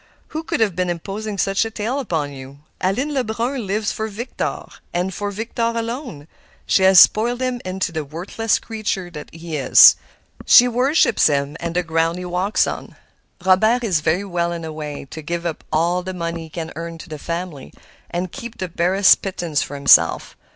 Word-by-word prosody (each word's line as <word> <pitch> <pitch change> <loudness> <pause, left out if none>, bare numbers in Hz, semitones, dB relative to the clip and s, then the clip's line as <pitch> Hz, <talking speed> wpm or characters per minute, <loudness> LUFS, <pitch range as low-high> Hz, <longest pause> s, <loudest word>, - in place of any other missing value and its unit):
Who 315 - -4
could 280 - -2
have 205 -6 +2
been 180 0 -1
imposing 200 +5 -5
such 195 +2 +1
a 225 - -4
tale 225 +5 -3
upon 160 - -2
you? 135 +1 -11 0.2
Aline 255 +11 0
Lebrun 240 -1 -2
lives 210 +2 -1
for 220 - -3
Victor, 225 +4 -4 0.3
and 180 +2 -1
for 205 +2 -3
Victor 225 +4 -5
alone. 230 - -5 0.4
She - - +2
has 190 -1 +7
spoiled 235 +6 +5
him 255 -1 -2
into 185 -1 -3
the 160 -1 -3
worthless 180 +9 -1
creature 215 -5 -4 0.2
he 165 -1 -6
is. 135 - +8 0.5
She 245 - +7
worships 250 +1 +3
him 140 -1 -1
and 170 0 -4
the 180 - +1
ground 165 +1 0
he 180 - -6
walks 180 +4 +1
on. - - -6 0.5
Robert 220 +6 +4
is 185 -8 +1
very 160 +5 0
well 170 -2 -1
in 170 -1 -5
a 160 - -6
way, 150 -2 -6
to 160 - -7
give 170 +3 -4
up 165 -2 -4
all 170 +3 +1
the 185 +1 -6
money 170 -1 -4
he - - -14
can 160 0 -6
earn 165 +1 -6
to 165 - -11
the 155 -2 -8
family, 170 -4 -5 0.4
and 175 0 -3
keep 235 -4 -8
the 185 - -4
barest 185 +4 +4
pittance 175 -6 -2
for 145 - -5
himself. 140 - +4
180 Hz, 185 wpm, -20 LUFS, 165-220 Hz, 0.5 s, is